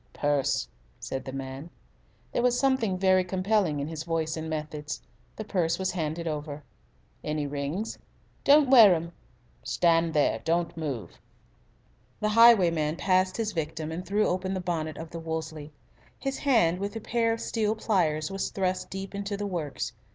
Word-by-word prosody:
"Purse," 145 - 0 0.3
said 135 - -5
the 130 - -5
man. 135 +3 -6 0.6
There - - 0
was 245 0 +2
something 250 -8 +1
very 185 0 +4
compelling 185 -3 +1
in 140 - -3
his 160 -1 -5
voice 160 -1 -1
and 160 0 -5
methods. 150 -2 -4 0.4
The 215 - -5
purse 180 -6 0
was 190 0 -1
handed 165 -1 -3
over. 150 -1 -4 0.6
"Any 150 -1 -2
rings?" 145 +9 -3 0.4
"Don't 285 -1 +5
wear 220 -8 +9
'em." 170 +1 -4 0.5
"Stand 165 -1 +2
there! 150 - +2
Don't 170 +1 0
move!" 130 - -5 1.0
The 215 - 0
highwayman 180 -9 +5
passed 185 +1 +1
his 220 -2 -1
victim 160 -2 -3
and 170 +3 -4
threw 205 +3 +1
open 185 +1 -1
the - - -2
bonnet 165 -3 -3
of 160 0 -8
the 170 - -6
Wolseley. 160 -2 -5 0.5
His 270 -1 -3
hand, 205 -11 +3
with 200 +2 -4
a - - -3
pair 230 +1 0
of 225 - -2
steel 220 -2 0
pliers, 165 -8 0
was 195 0 -2
thrust 185 -1 -2
deep 195 +1 -6
into 200 0 -3
the 205 - -3
works. 170 -7 -3
170 Hz, 165 wpm, -27 LUFS, 155-200 Hz, 1.0 s, wear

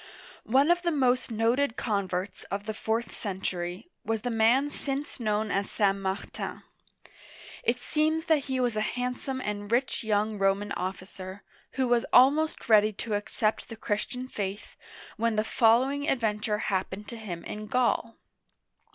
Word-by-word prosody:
One 275 +7 +5
of 350 0 +3
the 350 - +1
most 255 -5 +2
noted 230 +3 +1
converts 195 -3 -2
of 200 +1 -4
the 220 - -3
fourth 225 +2 -2
century 185 - -4
was 225 -1 -2
the 245 - -1
man 235 +6 +3
since 280 0 -4
known 215 -2 0
as 195 +1 0
St. 200 -2 +2
Martin. 195 0 -4 1.0
It 235 +1 +2
seems 310 +5 0
that 305 -4 +2
he 265 -2 -1
was 245 -3 +1
a 215 - +1
handsome 250 +3 -2
and 205 -2 -4
rich 250 +1 +1
young 210 -1 0
Roman 195 +1 +1
officer, 185 +1 -5 0.3
who 260 -2 +1
was 240 -1 +2
almost 290 +5 +4
ready 215 -1 +6
to 215 +2 -4
accept 215 +2 -1
the 225 - -6
Christian 220 +4 -3
faith, 200 -4 -5 0.4
when 230 0 +1
the 215 - +2
follow 235 +4 +4
ing 285 +1 -2
adventure 210 -3 0 0.2
happened 190 +2 -2
to 235 - -6
him 180 -6 -6
in 215 0 -6
Gaul. 240 -1 +1
220 Hz, 155 wpm, -28 LUFS, 205-255 Hz, 1.0 s, ready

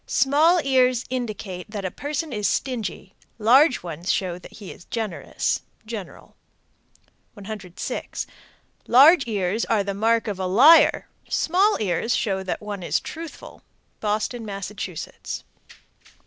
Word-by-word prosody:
Small 310 +6 +4
ears 255 -2 +2
indicate 215 -7 -5
that 205 -2 -5
a 185 - -2
person 290 - -4
is 210 -1 0
stingy. 220 -7 -3 0.2
Large 255 - +4
ones 170 +1 -3
show 180 -2 -2
that - - -14
he 205 -4 -9
is - - -14
generous. 220 -6 -2 0.2
General. 215 -4 -8 1.0
106. 200 -3 -6 0.6
Large 275 +4 +7
ears 205 0 -1
are 220 -3 +2
a 200 0 -3
mark 225 +3 +1
of 200 -3 -3
a 185 - -1
liar. 275 - +6 0.2
Small 385 +6 +2
ears 210 +3 0
show 195 -4 -1
that 190 - -4
one 205 -2 -6
is 175 - 0
truthful. 330 0 -9 0.4
Boston, 215 +3 -2
Mass. 200 -2 -5
107. 185 -5 -6
215 Hz, 130 wpm, -23 LUFS, 195-255 Hz, 1.0 s, Large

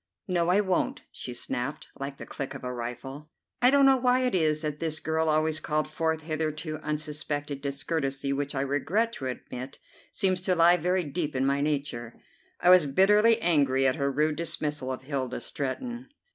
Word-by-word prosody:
"No, 175 -2 +1
I 195 +3 +4
won't," 190 -3 0
she 125 - -5
snapped, 125 +3 -3
like 140 0 -5
the - - -8
click 135 0 -6
of 140 - -8
a 125 0 -3
rifle. 135 +5 -6 0.3
I 250 - +7
don't 280 0 +5
know 270 -1 +6
why 250 0 +3
it 250 -1 0
is 155 -3 +2
that 150 -1 -3
this 160 -1 0
girl 160 0 0
always 155 0 +2
called 155 0 -1
forth 160 +1 -1
hitherto 155 0 -3
unsuspected 150 -2 -4
discourtesy 140 -1 -2
which 140 +1 -3
I 135 - 0
regret 165 - 0
to 135 - -5
admit 130 +1 -6 0.3
seems 185 -2 +1
to 185 0 +1
lie 170 +1 +6
very 180 +2 +1
deep 150 -1 -3
in 130 +1 +1
my 140 +1 +1
nature. 140 -6 -2 0.4
I 180 - +5
was 180 -5 +7
bitterly 210 +9 +5
angry 140 -5 +3
at 130 +3 +2
her 140 -1 0
rude 150 +2 +1
dismissal 150 -5 -2
of 130 0 -5
Hilda 130 -3 -3
Stretton. 240 - -5
150 Hz, 185 wpm, -28 LUFS, 140-175 Hz, 0.4 s, I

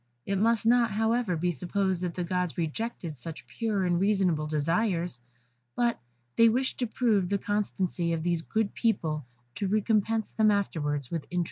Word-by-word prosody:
It 195 -1 0
must 225 +1 +2
not, 235 0 +4
however, 220 -1 +1
be 175 +2 +1
supposed 185 +3 -1
that 175 -2 -3
the 180 - -2
gods 180 -1 -1
rejected 170 - -3
such 165 +5 -8
pure 215 -5 -1
and 175 -1 +2
reasonable 185 -6 +2
desires, 165 - 0 0.6
but 240 -1 +1 0.4
they 230 0 +7
wished 260 +4 0
to 245 - 0
prove 215 -6 +1
the 200 - +2
constancy 190 -4 -1
of 165 -1 -1
these 170 -1 +1
good 215 +4 -1
people, 155 - 0 0.3
to 200 - -2
recompense 215 +1 +1
them 220 -1 +3
afterwards 150 -9 -1
with 165 -3 -3
interest. 180 - -1
190 Hz, 165 wpm, -28 LUFS, 170-220 Hz, 0.6 s, they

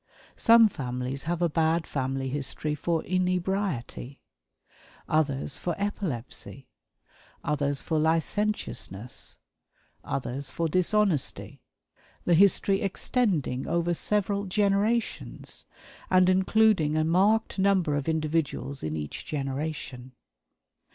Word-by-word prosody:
Some 230 -1 +7
families 130 -5 -4
have 175 0 0
a - - +4
"bad 160 +1 +1
family 135 -1 -2
history" 145 +2 -2
for 160 +2 -1
inebriety; 180 - -2 0.9
others 140 -3 0
for 175 -2 -2
epilepsy; 140 - -4 0.8
others 145 -1 -1
for 160 -2 0
licentiousness; 160 - -2 0.7
others 135 +1 -3
for 165 - -1
dishonesty 185 -2 0 0.6
the 175 - +3
history 195 +2 +4
extending 190 - 0
over 170 +1 +1
several 200 +2 0
generations, 205 +4 -1 0.4
and 185 0 +5
including 190 -4 +3
a 155 - +3
marked 200 +6 +2
number 190 -6 +3
of 145 +2 -1
individuals 155 -3 -1
in 80 0 -3
each 75 -1 -6
generation. 135 -3 -4
160 Hz, 95 wpm, -27 LUFS, 140-195 Hz, 0.9 s, Some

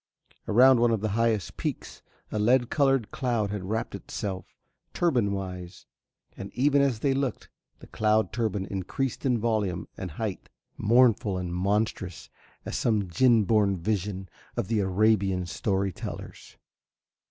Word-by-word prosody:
Around 125 +3 +6
one 120 0 +4
of 115 -3 0
the 110 - -1
highest 110 -5 0
peaks - - -5 0.3
a 105 - -1
lead 120 +3 +3
coloured 135 -6 +2
cloud 120 -6 -1
had 100 -3 -4
wrapped 110 +4 -2
itself 95 -3 -5 0.5
turban 125 -12 +2
wise, 90 -2 -6 0.5
and 100 - -8
even 140 +2 +3
as 130 -6 +1
they 140 - +2
looked 135 -3 -2 0.3
the - - -14
cloud 110 0 +1
turban 110 -5 -1
increased 110 +9 -3
in 125 -2 +2
volume 105 -6 -1
and 95 - -5
height, 100 +4 -5 0.3
mournful 115 -4 +3
and 90 -1 -4
monstrous 95 -1 -2 0.3
as - - -4
some 105 -5 0
djin 120 +3 +4
born 100 -2 +2
vision 95 +1 -2 0.3
of 95 - -2
the 115 -2 +1
Arabian 95 -1 +2
story 95 +2 -1
tellers. - - -9
105 Hz, 140 wpm, -27 LUFS, 95-120 Hz, 0.5 s, Around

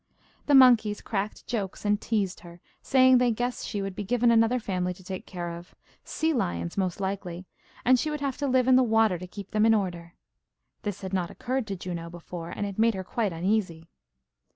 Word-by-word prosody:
The 290 - +5
monkeys 235 -6 +6
cracked 210 -1 -4
jokes, 210 -4 -4
and 205 +1 +1
teased 200 -5 -1
her, 175 0 -13 0.2
saying 260 -1 +5
they 250 -1 +3
guessed 245 +2 -3
she 205 -2 -3
would 195 -1 -5
be 205 - -4
given 235 +3 +2
another 225 +2 +4
family 180 -5 -2
to 185 - -16
take 185 0 -7
care 175 -2 -5
of 170 +1 -12 0.3
sea 320 0 -1
lions, 85 - -2
most 185 -2 -1
likely, 190 -2 -4 0.4
and 255 0 +5
she 305 - -1
would 300 0 -3
have 275 -2 -2
to 285 - -1
live 255 -1 +2
in 260 -1 +6
the - - +5
water 225 -6 +3
to 180 - -8
keep 200 +2 -10
them 215 0 +2
in 225 0 +5
order. 175 -4 -3 0.7
This 205 -2 -4
had 190 0 -6
not 180 -3 0
occurred 255 -2 -3
to 200 - -3
Juno 175 -2 -6
before, 170 0 -8
and 205 - -4
it 200 0 -6
made 225 -1 +3
her 190 - -4
quite 210 +2 -1
uneasy. 170 -2 -1
205 Hz, 210 wpm, -27 LUFS, 180-240 Hz, 0.7 s, monkeys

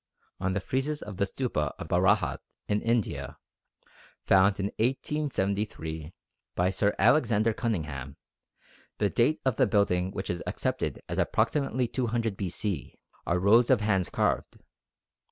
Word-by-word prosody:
On 95 0 0
the 100 - 0
friezes 135 +7 -2
of 105 -3 -8
the 100 - +2
Stupa 75 - -2
of - - -7
Bharahat - - +2 0.3
in 105 0 +1
India, 115 -2 -1 0.9
found 100 +1 +4
in 100 +1 -1
1873 100 - -2 0.4
by 90 +1 +2
Sir 100 +2 +1
Alexander 115 -6 +3
Cunningham 80 - -3 0.8
the 105 -2 +1
date 130 +6 +2
of 130 -4 +1
the - - +4
building 90 -4 +2
of 95 - -9
which 95 - -2
is 85 - -4
accepted - - -2
as - - -3
approximately 125 +2 +1
200 115 -3 -1
B.C. 95 -3 -3 0.3
are 85 - +2
rows 110 +6 +5
of - - +4
hands 95 -4 +1
carved. - - -1
105 Hz, 135 wpm, -28 LUFS, 95-120 Hz, 0.9 s, rows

